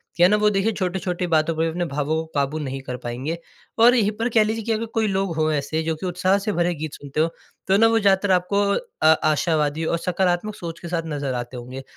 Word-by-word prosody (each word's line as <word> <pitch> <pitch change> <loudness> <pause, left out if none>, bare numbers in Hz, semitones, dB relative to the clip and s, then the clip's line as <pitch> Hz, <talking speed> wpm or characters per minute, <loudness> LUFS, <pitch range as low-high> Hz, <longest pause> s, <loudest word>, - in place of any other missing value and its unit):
क्या 175 - +5
है - - +5
ना 210 - +4
वो 210 0 +3
देखिए 205 +2 +1
छोटी-छोटी 180 -2 -2
बातों 160 +1 +3
पे 160 +1 +1
अपने 175 +2 -2
भावों 150 +1 -1
को 160 - -1
क़ाबू 140 +2 0
नहीं 135 -2 -4
कर 125 -1 -6
पाएँगे। 130 +8 -3 0.4
और 240 +2 +7
यहीं 210 -3 +2
पर 230 +2 0
कह 225 -2 +4
लीजिए 220 +1 -2
कि 230 - -1
अगर 220 +1 0
कोई 220 -1 +1
लोग 190 -3 -1
हो 155 0 +1
ऐसे 150 +2 -1
जो 160 0 -1
कि 155 - -7
उत्साह 185 +2 +1
से 210 - +1
भरे 175 0 +1
गीत 155 -1 -5
सुनते 145 +1 -6
हो 165 - +2 0.4
तो 195 +1 +4
ना 225 +2 +6
वो 225 0 +3
ज़्यादातर 195 -1 +3
आपको 185 +3 +2 0.4
अ, - - +2 0.2
आशावादी 155 0 +1
और 170 - 0
सकारात्मक 180 +3 -1
सोच 170 -1 -7
के 170 - -8
साथ 170 -1 -2
नज़र 145 -4 -3
आते 120 +1 -5
होंगे। 130 +2 -8
170 Hz, 245 wpm, -23 LUFS, 155-195 Hz, 0.4 s, और